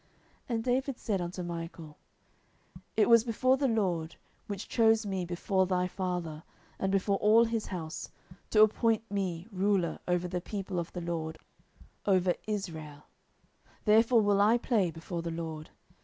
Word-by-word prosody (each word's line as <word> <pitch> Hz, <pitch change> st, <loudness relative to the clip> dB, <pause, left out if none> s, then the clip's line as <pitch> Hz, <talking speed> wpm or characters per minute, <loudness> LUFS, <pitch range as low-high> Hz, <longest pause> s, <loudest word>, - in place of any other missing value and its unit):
10:006:021 -, -, -36 dB, 0.5 s
And 225 Hz, -, -1 dB
David 255 Hz, +1 st, 0 dB
said 200 Hz, -4 st, -1 dB
unto 180 Hz, +1 st, -4 dB
Michal, 165 Hz, -2 st, -7 dB, 1.0 s
It 215 Hz, -, +5 dB
was 230 Hz, -1 st, +7 dB
before 255 Hz, +3 st, +2 dB
the 275 Hz, 0 st, +1 dB
LORD, 180 Hz, -8 st, 0 dB, 0.3 s
which 200 Hz, 0 st, -5 dB
chose 225 Hz, -1 st, +3 dB
me 190 Hz, -3 st, -2 dB
before 185 Hz, +2 st, 0 dB
thy 180 Hz, -1 st, +1 dB
father, 180 Hz, -4 st, -3 dB, 0.4 s
and 190 Hz, -, 0 dB
before 195 Hz, 0 st, +1 dB
all 220 Hz, +3 st, +5 dB
his 225 Hz, -1 st, -2 dB
house, 160 Hz, -4 st, -5 dB, 0.4 s
to 215 Hz, -1 st, +6 dB
appoint 220 Hz, +1 st, +2 dB
me 185 Hz, -4 st, -2 dB
ruler 190 Hz, -2 st, +1 dB
over 180 Hz, 0 st, +1 dB
the 180 Hz, 0 st, -3 dB
people 195 Hz, -1 st, -4 dB
of 170 Hz, -, -5 dB
the 180 Hz, -, -4 dB
LORD, 160 Hz, -2 st, -3 dB, 0.7 s
over 185 Hz, -2 st, +3 dB
Israel: 160 Hz, -8 st, -5 dB, 0.8 s
therefore 225 Hz, +2 st, +5 dB
will 200 Hz, -1 st, +3 dB
I 220 Hz, +4 st, +5 dB
play 225 Hz, -7 st, +1 dB
before 165 Hz, +2 st, -5 dB
the 170 Hz, -, -4 dB
LORD. 160 Hz, -2 st, -5 dB
190 Hz, 155 wpm, -30 LUFS, 170-215 Hz, 1.0 s, was